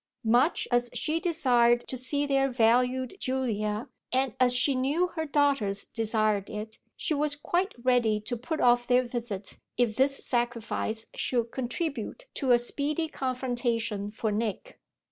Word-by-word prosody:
Much 245 +8 +3
as 245 0 +2
she 320 +1 0
desired 245 -9 +2
to - - -3
see 285 +3 0
their 275 -1 +2
valued 250 +1 +2
Julia, 220 -4 -1 0.2
and 260 -2 +1
as 250 -1 +4
she 275 +3 +4
knew 285 +8 +1
her 320 -2 -4
daughters 275 -9 +1
desired 215 -3 +1
it, 215 +1 -7 0.2
she 325 - 0
was 295 0 +1
quite 345 +6 -1
ready 240 -4 +3
to 240 +3 -3
put 280 +7 -4
off 240 0 +3
their 250 0 +4
visit 235 -5 -5 0.2
if 235 -3 +1
this 275 +1 +2
sacrifice 230 -2 -1
should 235 -2 -1
contribute 270 - -4
to 270 - -2
a 240 - +7
speedy 295 +6 -2
confrontation 240 -6 -2
for 220 0 -2
Nick. 215 -1 -3
245 Hz, 145 wpm, -28 LUFS, 225-275 Hz, 0.2 s, a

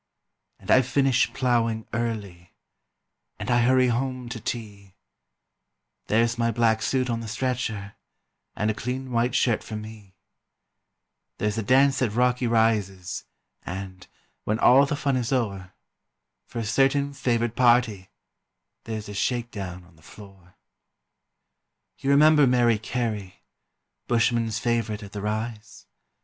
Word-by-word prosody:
And - - -5
I 130 - +7
finish 130 0 +2
ploughing 115 -3 0
early, 105 -7 -4 0.8
And - - -4
I 120 0 +4
hurry 130 +1 +4
home 130 0 -2
to 115 - -5
tea 100 -4 -7 1.1
There's 115 +2 +1
my 115 0 +2
black 115 -1 +2
suit 130 +3 0
on 115 -2 -1
the 115 - -7
stretcher, 110 -4 -3 0.6
And 105 +1 0
a - - -3
clean 125 +4 -5
white 120 +1 +1
shirt 120 -4 +2
for 110 - -7
me; 105 -3 -10 1.2
There's 105 +1 -1
a - - 0
dance 135 +4 +3
at 110 -5 0
Rocky 125 0 +2
Rises, 105 -5 0 0.4
And, 95 0 -7 0.4
when 105 - -1
all 135 +4 +6
the 145 - -1
fun 140 -2 0
is 120 -1 -2
o'er, 100 -8 -2 0.8
For - - -9
a 115 - -1
certain 135 +5 +2
favoured 120 -3 -1
party 120 -6 +3 0.8
There's 110 -2 -5
a 105 - -7
shake 120 +3 -1
down 90 -4 -6
on 85 -2 -22
the - - -22
floor. 95 0 -15 1.4
You 135 - -2
remember 150 0 +6
Mary 120 -3 +3
Carey, 110 -5 -4 0.6
Bushmen's 115 -2 +1
favourite 110 -2 -1
at 100 - -10
the 105 - -6
Rise? 110 +1 -5
115 Hz, 135 wpm, -25 LUFS, 105-125 Hz, 1.4 s, I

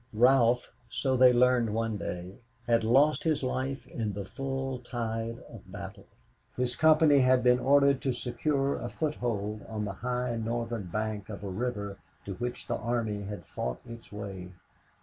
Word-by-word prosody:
Ralph, 125 0 +4 0.2
so 130 +3 0
they 130 0 +7
learned 120 -3 +3
one 115 -1 -1
day, 90 +1 -6 0.3
had 115 -1 +3
lost 135 +7 +4
his 155 -4 +1
life 130 +1 -2
in 110 -3 -3
the 100 0 -5
full 135 +2 -3
tide 115 -2 -3
of 95 -5 -13
battle. 100 0 -8 0.5
His 125 -1 0
company 155 -1 +5
had 130 -1 +4
been 125 0 +5
ordered 140 +1 +4
to 135 - 0
secure 135 +3 -1
a 120 - -4
foothold 110 -9 -2
on 105 -1 -3
the 100 - -4
high 125 -1 -1
northern 115 -1 -2
bank 105 +1 -3
of 105 -1 -7
a 100 - -4
river 100 -1 -3 0.3
to 100 - -4
which 120 +5 -4
the - - -1
army 115 -3 -1
had 105 +1 -7
fought - - -4
its 115 0 -10
way. 100 -3 -6
120 Hz, 165 wpm, -29 LUFS, 105-130 Hz, 0.5 s, they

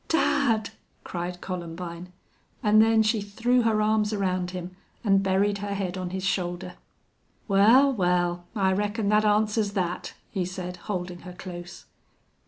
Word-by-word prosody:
"Dad!" 275 -9 +2 0.3
cried 175 0 -5
Columbine, 175 0 -6 0.5
and 215 0 +6
then 225 0 +4
she 215 0 +1
threw 235 +5 +1
her 220 -2 +2
arms 215 0 +2
around 185 -3 -1
him 180 0 -7 0.3
and 195 -3 +4
buried 200 +1 +1
her 200 0 -3
head 190 -2 -3
on 185 -1 -4
his 190 +1 -4
shoulder. 180 -1 -2 0.7
"Wal, 230 +8 +5
wal, 175 -3 +1
I 190 -2 +2
reckon 205 +1 -1
that 210 0 +4
answers 210 0 +2
that," 180 -3 -3 0.2
he 190 -3 -1
said, 180 0 -5
holding 180 -3 -5
her 180 +1 -10
close. 175 -1 -9
195 Hz, 145 wpm, -26 LUFS, 180-215 Hz, 0.7 s, and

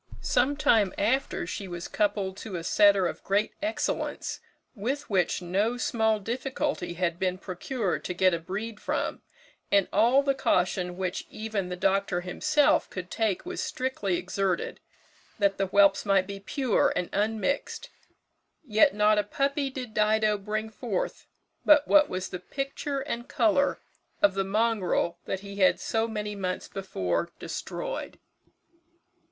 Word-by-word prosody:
Some 275 +4 +2
time 220 -9 +3
after 255 -1 0
she 195 +3 -5
was 175 -1 -6
coupled 200 -2 0
to 205 -2 -6
a 170 - -4
setter 200 +1 +5
of - - -4
great 205 +2 +1
excellence, 315 +2 -2 0.3
which 265 +7 -3
with 180 -1 +1
no 205 +7 0
small 220 -3 +1
difficulty 255 -2 -2
had 170 -1 -1
been 185 -1 0
procured 195 +3 -3
to 180 - -3
get 185 0 +4
a 170 - 0
breed 210 +6 -5
from, - - -2 0.5
and 200 -2 +4
all 240 +7 +5
the 275 -1 +2
caution 180 -6 0
which 185 -1 -3
even 215 -4 -3
the 180 - -3
doctor 195 -1 +1
himself 295 - +2
could 185 -1 -7
take 220 - 0
was 360 - -4
strictly 230 -8 -1
exerted, 185 0 -2 0.6
that 200 -2 +1
the 195 - +1
whelps 200 +1 +4
might 195 -2 +3
be 200 0 -7
pure 250 +3 +1
and 180 -1 -1
unmixed; 220 +6 -1 0.7
yet 215 -4 +4
not 210 0 +4
a - - +2
puppy 275 +6 -1
did 255 -4 -7
Dido 215 0 +3
bring 215 +2 -3
forth - - -3 0.4
but 300 -1 +6
what 300 -1 +6
was 185 0 -3
the 180 - -5
picture 275 +6 -4
and 240 -3 -5
colour 250 +5 +2 0.4
of 200 -1 +4
the 195 0 0
mongrel 195 -4 0
that 195 - -3
he 200 0 -9
had 190 -2 +4
so 225 0 0
many 210 -2 -4
months 185 -2 -3
before 170 - -2
destroyed. - - -5
205 Hz, 150 wpm, -27 LUFS, 185-235 Hz, 0.7 s, but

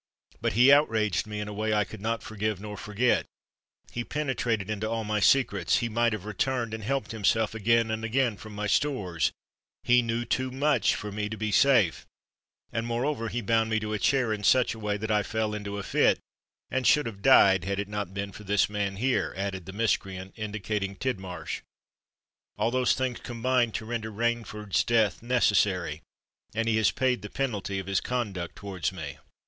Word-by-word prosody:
"But - - 0
he 125 +5 +6
outraged 110 - +3
me 105 0 -5
in 105 - -4
a 105 - -6
way 110 +1 0
I 105 - +3
could 100 - -10
not 115 +2 -2
forgive 105 -2 -2
nor 105 0 -7
forget—he 115 +2 -3
penetrated 120 -8 -1
into 110 0 -2
all 115 0 -1
my 105 0 -1
secrets—he 115 -2 +3
might 115 +1 +2
have 105 -3 -4
returned 115 +2 -1
and 110 -1 -5
helped 125 -2 -2
himself 110 0 +1
again 115 +1 +2
and 110 0 -3
again 120 0 +1
from 105 +1 -11
my 105 +1 -3
stores—he 105 - 0
knew 115 0 -2
too 130 +1 -1
much 135 -1 +2
for 105 - -5
me 105 +1 -3
to 110 - -5
be 110 0 -2
safe—and 115 0 0
moreover 120 +1 -1
he 120 - -2
bound 110 +1 +2
me 110 -1 +1
to 110 0 -4
a 105 - -1
chair 130 -3 +2
in 105 -1 -5
such 125 +4 +4
a 110 - -10
way 105 -1 -1
that 110 +1 -3
I 105 -1 +3
fell 110 +1 -2
into 100 -1 -4
a 100 - -4
fit, - - +3 0.5
and 130 -1 +1
should 150 - +5
have 105 -4 -6
died 100 -6 +6
had 100 0 -1
it 100 - -2
not 105 -3 -4
been 100 +1 -4
for 105 - -11
this 100 0 +2
man 100 -1 -1
here," 125 +6 0
added 95 -2 -4
the - - -5
miscreant, 95 -3 -1
indicating 105 -2 -3
Tidmarsh. 95 -9 -4 1.0
"All 115 - +1
those 125 -2 +2
things 130 -2 -2
combined 120 -1 0
to 110 - -3
render 110 -1 -4
Rainford's 110 -2 -1
death 110 -6 +2
necessary—and 105 -2 -1
he 110 -1 +2
has 110 -3 +4
paid 130 -1 0
the 105 - -7
penalty 105 -7 -2
of 95 - -4
his 95 0 0
conduct 100 -9 -3
towards 95 -4 -3
me." 80 -7 -7
110 Hz, 185 wpm, -28 LUFS, 100-120 Hz, 1.0 s, he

